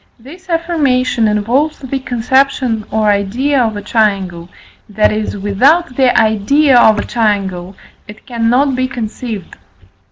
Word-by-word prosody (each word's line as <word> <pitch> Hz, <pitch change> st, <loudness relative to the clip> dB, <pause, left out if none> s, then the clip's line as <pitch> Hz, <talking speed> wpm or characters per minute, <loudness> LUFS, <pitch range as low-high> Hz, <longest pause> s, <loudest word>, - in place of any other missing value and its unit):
This 340 Hz, +10 st, -15 dB
affirmation 285 Hz, -9 st, 0 dB
involves 235 Hz, +9 st, 0 dB
the 270 Hz, 0 st, -5 dB
conception 250 Hz, -2 st, 0 dB
or 215 Hz, 0 st, +1 dB
idea 245 Hz, +8 st, 0 dB
of 220 Hz, -3 st, -1 dB
a 205 Hz, -, -7 dB
triangle, 190 Hz, -6 st, -1 dB, 0.4 s
that 210 Hz, +1 st, +1 dB
is, 215 Hz, -1 st, -3 dB
without 250 Hz, -, +1 dB
the 260 Hz, -1 st, +3 dB
idea 235 Hz, +7 st, +2 dB
of 220 Hz, -3 st, +5 dB
a -, -, -2 dB
triangle 195 Hz, -5 st, -2 dB, 0.3 s
it 210 Hz, +1 st, -13 dB
cannot 245 Hz, +3 st, 0 dB
be 255 Hz, 0 st, -1 dB
conceived. 225 Hz, -4 st, -6 dB
230 Hz, 130 wpm, -14 LUFS, 210-270 Hz, 0.4 s, of